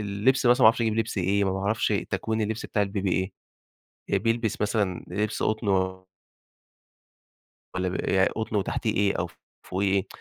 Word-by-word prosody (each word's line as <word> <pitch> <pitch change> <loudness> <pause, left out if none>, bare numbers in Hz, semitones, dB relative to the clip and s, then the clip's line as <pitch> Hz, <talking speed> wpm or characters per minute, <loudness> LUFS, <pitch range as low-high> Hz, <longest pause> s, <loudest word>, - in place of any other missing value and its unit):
اللبس 105 +6 +1
مثلًا 120 +1 +5
ما - - +9
اعرفش 115 +2 +5
اجيب 110 -1 +1
لبس 115 -2 -1
إيه، 100 +2 +2
ما 95 - 0
باعرفش 100 +5 0 0.2
تكوين 110 +3 -1
اللبس 110 +1 -3
بتاع 105 - 0
البيبي 100 -2 -1
ايه، 95 0 -3 0.7
بيلبس 115 -1 0
مثلًا 105 -4 0
لبس 105 +4 -2
قطن 110 0 0 2.1
والّا 95 0 -1
بيبقى 95 +1 +2
قطن 110 -1 -3
وتحتيه 100 - 0
إيه 100 0 +2
أو - - -2 0.4
فوقيه 95 +1 0
إيه؟ 95 -1 +1
100 Hz, 155 wpm, -26 LUFS, 95-110 Hz, 2.1 s, ما